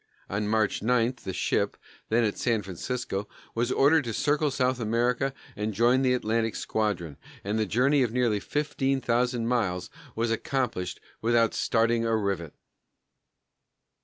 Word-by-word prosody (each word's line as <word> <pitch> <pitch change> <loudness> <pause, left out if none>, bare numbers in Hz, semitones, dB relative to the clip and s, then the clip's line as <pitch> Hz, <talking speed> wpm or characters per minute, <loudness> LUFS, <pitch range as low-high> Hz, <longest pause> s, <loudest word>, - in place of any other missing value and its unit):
On 105 +2 -1
March 110 -1 +1
9 120 +2 +2
the 95 - -2
ship, - - 0 0.3
then 115 +2 +3
at 105 -2 0
San 115 -4 +1
Francisco, 100 +2 -4 0.3
was 120 +2 0
ordered 145 +1 +4
to 115 - -3
circle 150 +5 +1
South 130 -2 0
America 120 +4 +1 0.2
and 105 0 -3
join 120 +4 +4
the 130 -1 +3
Atlantic 115 -1 0
squadron, 90 -9 -2 0.3
and 105 +3 -1
the 110 - +1
journey 135 +7 +3
of 120 -4 +1
nearly 120 -4 +1
fifteen 135 0 -1
thousand 120 -1 0
miles 95 -7 -1 0.2
was 115 0 0
accomplished 115 -7 -2 0.2
without 115 0 +3
starting 115 0 +2
a 115 -1 +2
rivet. 95 -7 -2
115 Hz, 145 wpm, -27 LUFS, 105-125 Hz, 0.3 s, ordered